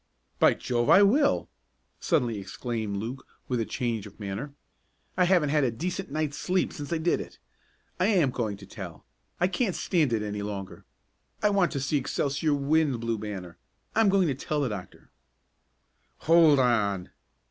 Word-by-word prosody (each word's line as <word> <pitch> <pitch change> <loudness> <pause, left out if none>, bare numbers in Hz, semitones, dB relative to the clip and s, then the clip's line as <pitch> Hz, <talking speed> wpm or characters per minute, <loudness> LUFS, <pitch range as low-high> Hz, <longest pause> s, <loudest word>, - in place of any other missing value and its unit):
"By - - +5
Jove 120 -1 -1
I 200 - +8
will!" 280 +8 +3 0.5
suddenly 125 - 0
exclaimed 110 0 -4
Luke 120 +6 -6 0.2
with 125 -2 -1
a 115 - 0
change 115 -5 -3
of 100 - -16
manner. 105 +8 -5 0.6
"I 180 - +3
haven't 175 -5 +3
had 150 0 +2
a 130 - +2
decent 180 +10 -4
night's 150 0 -2
sleep 185 0 0
since 145 0 -7
I 170 - +1
did 165 +2 +1
it. - - -11 0.6
I 185 - +3
am 175 - +3
going 110 -5 -2
to 100 - -12
tell. 95 -5 -9 0.3
I 180 - +3
can't 190 +1 -1
stand 160 -8 +1
it 110 -2 0
any 105 -1 -4
longer. 95 -3 -6 0.6
I 210 - +4
want 195 -3 +2
to 140 - -1
see 135 +3 0
Excelsior 145 +2 0
win 145 +1 +2
the - - -2
Blue 115 -1 -2
Banner. 95 -5 -7 0.3
I'm 220 -2 +4
going 190 -2 +3
to 140 - +1
tell 145 +3 -2
the 135 - 0
doctor!" 100 -4 -8 1.1
"Hold 165 -2 +6
on!" 105 -7 +1
135 Hz, 175 wpm, -27 LUFS, 105-165 Hz, 1.1 s, I